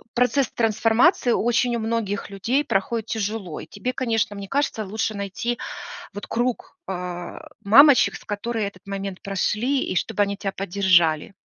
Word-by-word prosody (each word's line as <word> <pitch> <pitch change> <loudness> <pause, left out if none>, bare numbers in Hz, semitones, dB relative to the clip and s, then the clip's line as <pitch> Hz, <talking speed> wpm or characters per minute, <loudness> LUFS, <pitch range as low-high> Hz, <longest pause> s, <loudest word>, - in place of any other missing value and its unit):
процесс 250 +2 +2
трансформации 230 - +3
очень 240 +1 +2
у - - -1
многих 220 -3 -2
людей 240 +9 0
проходит 220 0 -1
тяжело. 210 -5 -3
И - - -9
тебе, 255 - -4
конечно, 225 -5 0
мне 200 -1 -7
кажется, 275 -4 -1
лучше 220 +2 -2
найти 200 +4 -3 0.5
вот 205 - -7
круг, 240 +7 -2
э, 180 -1 -5 0.3
мамочек, 270 +6 +7
с - - -13
которые 215 0 -2
этот 195 0 -16
момент 195 -1 -5
прошли, 220 +7 0
и 185 - -3
чтобы 205 - +1
они 200 0 -1
тя 195 -1 -3
поддержали. 180 -4 +2
215 Hz, 150 wpm, -23 LUFS, 195-240 Hz, 0.5 s, мамочек